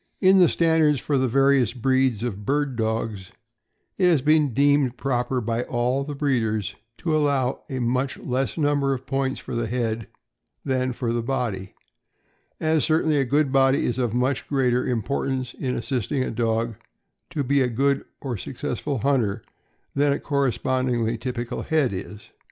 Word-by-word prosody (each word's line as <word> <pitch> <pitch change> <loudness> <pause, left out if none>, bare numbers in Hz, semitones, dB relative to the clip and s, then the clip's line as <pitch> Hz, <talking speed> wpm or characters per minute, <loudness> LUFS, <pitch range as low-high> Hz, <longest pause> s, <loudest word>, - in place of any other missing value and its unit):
In 190 0 +5
the 180 - +6
standards 160 -4 +3
for 140 0 0
the 130 - +2
various 135 -1 +3
breeds 130 -2 +1
of 105 -4 -4
bird 140 +2 0
dogs 110 -4 -2 0.7
it 185 - +4
has 160 -7 +3
been 150 -2 +3
deemed 140 -1 +2
proper 125 -1 -1
by 115 +1 -1
all 125 +3 0
the 145 +1 -6
breeders 115 - 0 0.2
to 160 -3 -1
allow 140 -4 +1
a 130 - -3
much 125 +2 0
less 130 +4 -2
number 145 -3 +1
of 130 +1 -9
points 135 0 -1
for - - -8
the 115 -1 -1
head 115 -2 -2 0.6
than 130 -1 0
for 115 -1 -2
the 120 - 0
body, 115 -6 -3 0.8
as 160 -1 +2
certainly 155 -1 +2
a 135 - +2
good 140 +2 +1
body 135 0 +3
is 125 - -1
of 120 -3 0
much 125 +2 0
greater 125 -3 +1
im 115 -4 0
portance 130 -1 -2
in 130 -2 -3
assisting 130 +2 -1
a - - -3
dog 115 0 -1 0.5
to 145 - -2
be 140 +1 +2
a 130 - +3
good 140 +4 +1 0.2
or 125 -5 -3
successful 130 +5 -4
hunter 120 -5 0 0.5
than 145 +1 +2
a 140 - -2
correspondingly 130 -4 0
typical 120 0 -4
head 150 -8 +1
is. 100 +2 -8
130 Hz, 165 wpm, -24 LUFS, 120-140 Hz, 0.8 s, the